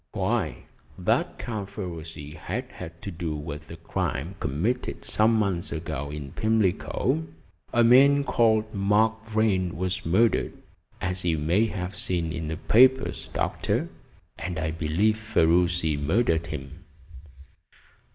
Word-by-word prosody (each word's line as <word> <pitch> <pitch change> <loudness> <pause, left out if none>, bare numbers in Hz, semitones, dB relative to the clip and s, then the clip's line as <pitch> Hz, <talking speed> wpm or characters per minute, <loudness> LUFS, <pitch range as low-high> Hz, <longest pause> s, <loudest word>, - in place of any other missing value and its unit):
"Why, - - -1 0.3
that - - 0
Count 105 -4 -4
Ferruci 80 -7 -7
has 95 +9 -4
had 85 -1 -10
to 100 - -4
do 80 -2 -3
with 75 +1 -7
a 85 - -7
crime 80 0 -3
committed 105 - -2
some 110 +2 +3
months 100 -5 0
ago 80 -3 -4
in 75 -2 -6
Pimlico. 100 -6 0 0.4
A 120 - +4
man 140 +4 +6
called 110 -4 +2
Mark 110 +2 +2
Vrain 105 -6 +1
was 95 +1 -2
murdered, 110 +8 +2 0.5
as 90 0 -2
you 85 -2 +1
may 85 +9 +2
have 95 -3 -4
seen 85 -3 -2
in 80 -2 -4
the 80 0 -3
papers, 130 +7 +3
Doctor, - - -1 0.5
and 90 -2 -4
I 80 0 -1
believe 85 +7 +1
Ferruci 85 -6 +2
murdered 80 +2 +1
him." 75 +2 -7
90 Hz, 130 wpm, -26 LUFS, 80-110 Hz, 0.5 s, man